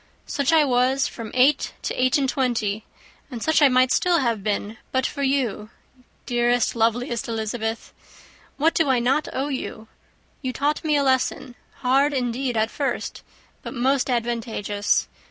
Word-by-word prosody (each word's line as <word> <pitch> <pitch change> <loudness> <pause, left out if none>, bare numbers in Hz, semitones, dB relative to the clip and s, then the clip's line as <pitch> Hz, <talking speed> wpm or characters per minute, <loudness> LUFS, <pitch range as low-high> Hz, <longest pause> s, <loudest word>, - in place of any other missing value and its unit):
Such 280 +1 0
I 315 -2 +5
was, 260 +1 +2
from 230 -2 -7
eight 265 +4 +3
to - - -2
eight 255 +2 +2
and 275 -2 +1
twenty; 230 -6 -1 0.4
and 240 -5 -6
such 315 0 +3
I 290 - +8
might 255 0 +3
still 355 -1 +3
have 235 -8 0
been 210 +1 -2
but 260 0 +1
for 280 - -3
you, 260 -6 0 0.6
dearest, 240 0 +1
loveliest 235 +1 0
Elizabeth! 225 0 -3 0.6
What 320 +3 +3
do 325 -4 +2
I 260 - +4
not 255 +5 +1
owe 275 +3 -2
you! 225 -5 -5 0.5
You 260 -2 -3
taught 290 +3 -1
me 305 -2 +2
a 285 - +2
lesson, 260 -1 0 0.3
hard 275 +3 +3
indeed 250 -1 -1
at 220 +1 +1
first, 280 -2 -3 0.4
but - - -7
most 265 +2 +1
advantageous. 225 -4 -1
255 Hz, 155 wpm, -23 LUFS, 230-275 Hz, 0.6 s, I